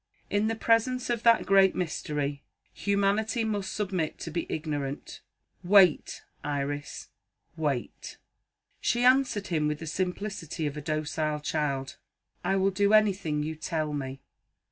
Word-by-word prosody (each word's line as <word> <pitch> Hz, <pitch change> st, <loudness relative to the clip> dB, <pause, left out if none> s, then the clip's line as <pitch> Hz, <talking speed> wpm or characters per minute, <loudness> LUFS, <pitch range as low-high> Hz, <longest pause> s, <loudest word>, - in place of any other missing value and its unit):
In 205 Hz, +1 st, +2 dB
the 225 Hz, -, 0 dB
presence 235 Hz, +3 st, +1 dB
of 235 Hz, -2 st, -1 dB
that 230 Hz, -1 st, +5 dB
great 195 Hz, -1 st, +5 dB
mystery, 150 Hz, -4 st, -2 dB, 0.3 s
humanity 200 Hz, +3 st, +1 dB
must 205 Hz, -3 st, -2 dB
submit 185 Hz, -6 st, -2 dB
to 165 Hz, -, -5 dB
be 170 Hz, +1 st, -3 dB
ignorant. 145 Hz, -3 st, -4 dB, 0.4 s
Wait, 185 Hz, -3 st, +4 dB, 0.2 s
Iris 145 Hz, 0 st, -4 dB, 0.5 s
wait!" 145 Hz, -6 st, -3 dB, 0.6 s
She 240 Hz, +1 st, +1 dB
answered 250 Hz, -5 st, +3 dB
him 155 Hz, -3 st, +1 dB
with 150 Hz, 0 st, -1 dB
the 160 Hz, -, -8 dB
simplicity 180 Hz, -1 st, -3 dB
of 145 Hz, -1 st, -2 dB
a 150 Hz, -, -5 dB
docile 155 Hz, 0 st, -2 dB
child: 145 Hz, -3 st, -2 dB, 0.5 s
"I 195 Hz, -, +1 dB
will 195 Hz, 0 st, +2 dB
do 200 Hz, +2 st, +2 dB
anything 190 Hz, -8 st, +3 dB
you 155 Hz, +1 st, -3 dB
tell 155 Hz, -1 st, -2 dB
me." 135 Hz, -1 st, -5 dB
170 Hz, 135 wpm, -28 LUFS, 150-205 Hz, 0.6 s, that